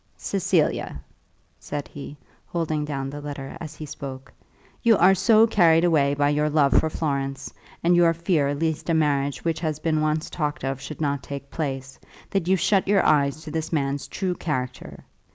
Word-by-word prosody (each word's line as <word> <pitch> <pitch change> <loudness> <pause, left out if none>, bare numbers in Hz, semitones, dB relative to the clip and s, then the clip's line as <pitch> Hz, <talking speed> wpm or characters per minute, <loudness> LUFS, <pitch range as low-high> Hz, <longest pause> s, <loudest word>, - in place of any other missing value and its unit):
"Cecilia," 185 -5 0 0.6
said 145 -1 -5
he, 145 0 -9 0.3
holding 155 -3 -2
down 135 -2 -4
the 145 +1 -7
letter 140 -2 -6
as 155 -2 -7
he 155 - -7
spoke, 135 -2 -8 0.5
"you 230 -3 +5
are 185 +3 +6
so 220 +3 +5
carried 170 -7 +4
away 145 -5 +3
by 145 0 +2
your 150 +1 +1
love 145 -2 +3
for 160 - +3
Florence, 140 -3 -3 0.3
and 175 +1 +4
your 170 -1 +5
fear 165 -4 0
lest 160 +2 -2
a 165 - +3
marriage 145 -2 0
which 165 -1 0
has 155 -3 -2
been 155 -1 0
once 155 +1 0
talked 150 -3 -3
of 135 0 -3
should 155 +2 -7
not 140 -2 0
take 140 -1 -8
place, 135 -4 -4 0.3
that 195 -4 0
you 190 - +4
shut 190 +2 +2
your 200 0 +3
eyes 145 +1 +2
to 155 - -8
this 160 0 -3
man's 140 -3 -1
true 185 +5 -2
character. 130 -7 -5
155 Hz, 180 wpm, -24 LUFS, 140-165 Hz, 0.6 s, are